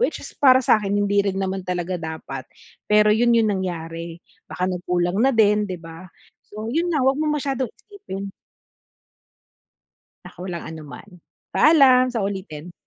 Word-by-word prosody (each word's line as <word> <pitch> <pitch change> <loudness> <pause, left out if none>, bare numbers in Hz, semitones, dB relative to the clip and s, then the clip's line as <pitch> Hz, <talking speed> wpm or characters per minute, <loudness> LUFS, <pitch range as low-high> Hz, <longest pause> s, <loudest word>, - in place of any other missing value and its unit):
Which - - +1
is - - -10
para 260 -2 +5
sa'kin, 205 -3 +2
hindi 205 0 +2
rin 195 -1 -1
naman 190 0 -2
talaga 180 0 -3
dapat, 160 -5 -7 0.4
pero 210 0 +5
yun 235 +2 +3
yung 220 -2 +3
nangyari, 165 -3 -5 0.3
baka 180 - -3
nagkulang 180 0 -1
na 265 - +4
din, 210 -2 +3
'di 185 - -4
ba? 165 +2 -11 0.4
So, 215 +2 -6
yun 335 +3 0
na 285 -4 +1
'wag 270 +2 +2
mo 310 - 0
masyadong 265 -4 -2
isipin. 200 - -9 2.0
Naku, 185 +1 -9
walang 170 -2 -5
anuman. 160 +4 -10 0.4
Paalam, 265 -5 +5
sa 230 -5 -2
ulitin. 180 -4 -6
200 Hz, 150 wpm, -22 LUFS, 175-240 Hz, 2.0 s, para